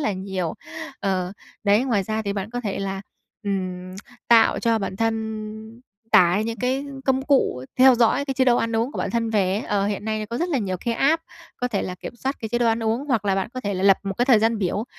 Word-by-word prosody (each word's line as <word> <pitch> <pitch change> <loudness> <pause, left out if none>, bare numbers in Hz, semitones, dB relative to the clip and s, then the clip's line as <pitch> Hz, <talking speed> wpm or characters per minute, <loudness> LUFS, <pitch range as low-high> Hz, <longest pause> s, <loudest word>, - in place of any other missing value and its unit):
là 215 - 0
nhiều. 185 -3 -3 0.5
Ờ, 185 -2 -1 0.3
đấy, 205 +5 +4
ngoài 230 -7 +1
ra 215 +3 -2
thì 200 -2 -2
bạn 200 +1 -4
có 245 +1 -3
thể 205 -5 -3
là, 195 -1 -3 0.4
ừm, 185 -2 -3 0.3
tạo 230 -1 +6
cho 230 -2 +2
bản 195 -2 -4
thân 220 0 -3 0.3
tải 180 +4 +5
những 230 0 -4
cái 260 +5 -1 0.2
công 265 0 +2
cụ 265 - +1
theo 260 0 +8
dõi 240 +4 +3
cái 270 -1 -3
chế 260 - +3
độ 245 -2 +4
ăn 230 0 0
uống 235 +6 0
của - - -6
bản - - -1
thân 230 -1 -1
về 195 -4 +2
ấy, 200 - 0
ờ, 200 -2 0
hiện 205 0 -3
nay 215 -1 -2
có 235 +2 -4
rất 345 - 0
là 295 -6 +1
nhiều 190 -5 -2
cái 235 - 0
app 310 +7 +2 0.3
có 250 - -2
thể 210 -5 -1
là 180 - -4
kiểm 210 +6 -9
soát 270 +4 -2
cái 220 - -4
chế 240 - 0
độ 240 - +2
ăn 225 0 +1
uống. 225 +5 0
Hoặc 230 -6 +1
là 195 -1 +2
bạn 195 +1 -1
có 255 - -3
thể 200 -4 -2
là 185 - -2
lập 195 -1 +6
một 195 -1 -3
cái 245 - +4
thời 250 -4 +6
gian 225 +1 +1
biểu, 200 +2 -1
220 Hz, 255 wpm, -23 LUFS, 195-240 Hz, 0.5 s, theo